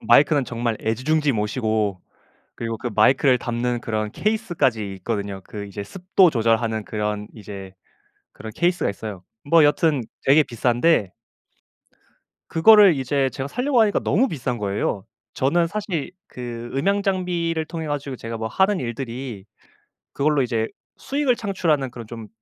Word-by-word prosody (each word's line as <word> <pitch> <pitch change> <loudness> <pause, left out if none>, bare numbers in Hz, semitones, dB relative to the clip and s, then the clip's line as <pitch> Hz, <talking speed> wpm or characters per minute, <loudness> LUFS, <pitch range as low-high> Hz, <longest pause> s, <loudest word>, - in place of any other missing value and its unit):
마이크는 140 +5 +4
정말 115 -2 -2
애지중지 140 +6 +1
모시고 105 -3 -1 0.5
그리고 115 -1 -4
그 120 +2 -4
마이크를 130 +4 +4
담는 120 0 -2
그런 110 -1 -2
케이스까지 155 - 0
있거든요. 100 0 -4
그 105 -1 -7
이제 100 +1 -6
습도 185 - +3
조절하는 115 -3 +1
그런 105 -1 -3
이제 100 -3 -9 0.6
그런 110 - -9
케이스가 175 +1 +1
있어요. 100 -2 -7 0.2
뭐 165 -1 +6
여튼 145 -2 +2 0.2
되게 145 +3 +6
비싼데 120 - +1 1.4
그거를 200 +1 +7
이제 135 0 0
제가 135 +1 -5
사려고 250 - +1
하니까 210 -2 +3
너무 255 +6 +2
비싼 130 - -3
거예요. 100 -1 -2 0.3
저는 165 +6 +2
사실 185 -6 -3 0.2
그 120 -1 -7
음향 200 +9 +1
장비를 175 -4 -1
통해 160 -1 -5
가지고 140 -2 -3
제가 115 -1 -6
뭐 110 - -3
하는 190 - +2
일들이 120 -3 -5 0.7
그걸로 145 0 +2
이제 115 -3 0 0.3
수익을 275 -3 0
창출하는 170 - 0
그런 120 -2 -9
좀 115 -1 -8
130 Hz, 325 characters per minute, -22 LUFS, 110-165 Hz, 1.4 s, 그거를